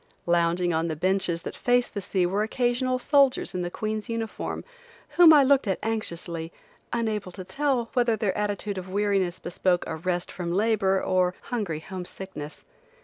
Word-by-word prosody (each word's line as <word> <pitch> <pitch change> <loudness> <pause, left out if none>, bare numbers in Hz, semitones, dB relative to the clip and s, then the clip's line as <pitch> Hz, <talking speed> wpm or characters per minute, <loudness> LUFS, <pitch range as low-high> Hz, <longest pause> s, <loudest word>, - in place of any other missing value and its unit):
Lounging 175 0 +2
on 160 +1 0
the 160 - -2
benches 180 0 0
that - - -6
face 245 0 +2
the 200 - -5
sea 185 -1 0
were 195 +4 0
occasional 245 +3 0
soldiers 275 -2 +3
in 180 - -2
the 175 - -2
Queen's 215 +4 -4
uniform, 230 -1 -4 0.5
whom 345 -2 +7
I 295 -3 +8
looked 270 -3 +3
at 190 - +1
anxiously, 170 -7 -3 0.4
unable 220 -5 -2
to 185 - -7
tell 245 +4 -1
whether 240 -3 +3
their 205 -3 -1
attitude 205 -1 -2
of 185 0 -9
weariness 195 -2 +1
bespoke 180 0 0
a 160 - -4
rest 175 +2 -2
from 175 -2 -4
labor 195 -1 +2
or 185 -1 +1
hungry 200 -11 -3
home 185 +1 -7
sickness. 165 -6 -8
195 Hz, 170 wpm, -26 LUFS, 175-230 Hz, 0.5 s, I